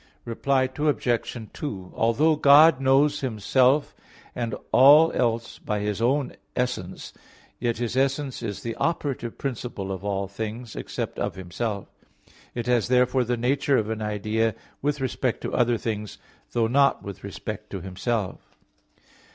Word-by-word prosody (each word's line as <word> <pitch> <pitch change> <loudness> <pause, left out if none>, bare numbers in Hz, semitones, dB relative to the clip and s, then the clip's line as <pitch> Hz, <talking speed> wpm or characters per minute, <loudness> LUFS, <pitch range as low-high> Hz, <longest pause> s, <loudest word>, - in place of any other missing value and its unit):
Reply 130 +3 +1
Obj. 125 -5 0 0.2
2: 95 -11 -6
Although 145 +8 +3
God 145 0 +7
knows 140 +2 +3
Himself 130 +4 +2 0.4
and 120 -2 -3 0.2
all 150 +5 +7
else 115 -1 -1
by 105 -1 -2
His 105 +1 -2
own 135 +3 +1 0.2
essence, 125 -8 -3 0.5
yet 120 -1 -1
His 120 0 -2
essence 135 0 0
is 105 -4 -5
the 115 - -3
operative 140 -8 -2
principle 120 -7 -4
of 95 0 -5
all 100 -1 -1
things, 110 +4 -6
except - - -5
of - - -2
Himself. 100 +3 -4 0.7
It 120 -1 -3
has 125 -2 +2
therefore 125 +1 +3
the 120 +1 -1
nature 135 +3 +2
of 110 0 -1
an 110 -1 -3
idea 105 +1 0 0.3
with 145 0 -1
respect 130 -1 -1
to - - -4
other 120 -1 +2
things; 105 -2 -4 0.4
though 115 -1 +2
not 140 +4 +3
with 100 -1 -8
respect 105 +1 -6
to 95 - -5
Himself. 95 +2 -4
120 Hz, 145 wpm, -25 LUFS, 105-135 Hz, 0.7 s, God